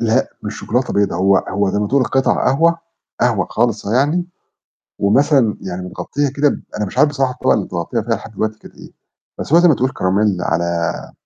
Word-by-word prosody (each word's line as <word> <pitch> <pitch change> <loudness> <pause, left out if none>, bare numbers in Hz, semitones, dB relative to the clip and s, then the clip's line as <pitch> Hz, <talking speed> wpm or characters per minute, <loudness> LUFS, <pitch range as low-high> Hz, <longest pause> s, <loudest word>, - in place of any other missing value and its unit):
لأ، 115 +3 +1
مش 105 0 -5
شوكولاتة 125 +3 -1
بيضا، 100 -4 +1
هو 95 +2 +3
هو 100 +1 0
زي 100 - -1
ما 105 - 0
تقول 135 0 +2
قِطَع 135 +1 +1
قهوة، 165 +5 +2 0.4
قهوة 120 -5 +2
خالصة 115 -2 0
يعني، 150 +7 +2 0.7
ومثلًا 130 +1 +3
يعني 90 -1 -5
متغطية 140 +10 -3
كده 145 +1 +3
ب - - -3
أنا 105 - -1
مش 110 - -7
عارف 150 - +6
بصراحة 135 -3 0
الطبقة - - +1
اللي 105 - 0
متغطية 90 +7 -3
فيها 115 +1 -1
لحد 110 - -11
دلوقتي 110 +1 -2
كانت - - -15
إيه، - - -13 0.5
بس - - -5
هو 170 - +7
زي 175 - +5
ما 155 - +5
تقول 130 +1 0
كراميل 100 -1 +1
على 85 0 -2
115 Hz, 205 wpm, -18 LUFS, 100-135 Hz, 0.7 s, هو